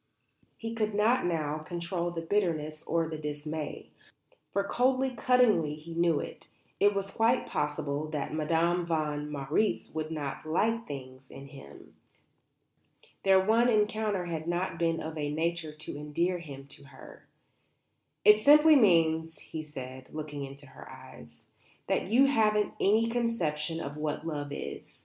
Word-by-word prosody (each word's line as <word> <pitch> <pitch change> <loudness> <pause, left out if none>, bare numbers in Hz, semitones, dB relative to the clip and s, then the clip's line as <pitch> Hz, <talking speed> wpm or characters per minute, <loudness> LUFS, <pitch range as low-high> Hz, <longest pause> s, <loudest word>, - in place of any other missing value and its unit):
He 225 0 -5
could 215 -2 -1
not 220 +1 +3
now 155 -3 -1
control 170 +2 -3
the 165 -1 -5
bitterness 160 -5 -1
or 165 0 +1
the 160 -1 -6
dismay; 150 0 -5 0.6
for, 200 - +1
coldly, 255 +5 +1
cuttingly 230 - +3
he 155 +2 -10
knew 170 -2 +2
it, - - -8 0.3
it 205 0 +4
was 195 0 -2
quite 230 +4 +2
possible 150 0 -2
that 150 -1 -4
Madame 165 +3 +1
von 150 -3 -2
Marwitz 150 +8 -1
would 155 0 -3
not 150 -4 -4
"like 225 +9 0
things" 130 -1 -9
in 140 0 -11
him. 100 - -13 1.3
Their 190 -1 +5
one 225 +5 +3
encounter 210 -3 +1
had 165 -2 -4
not 175 0 -2
been 165 -1 +1
of 160 0 -5
a 145 -1 -1
nature 165 0 -1
to 155 -1 -7
endear 170 +5 -1
him 140 -5 -9
to 140 - -13
her. 140 - -14 1.0
"It 210 +1 +7
simply 300 +4 +7
means," 165 - +3
he 160 - -7
said, 130 -4 -9
looking 150 -2 -5
into 140 +1 -9
her 130 - -13
eyes, - - -13 0.4
"that - - 0
you 245 +7 +5
haven't 215 -6 +2
any 220 +3 +3
conception 175 -10 -1
of 145 -1 -6
what 150 0 -3
love 145 -3 -4
is. 145 - -7
165 Hz, 150 wpm, -29 LUFS, 150-210 Hz, 1.3 s, It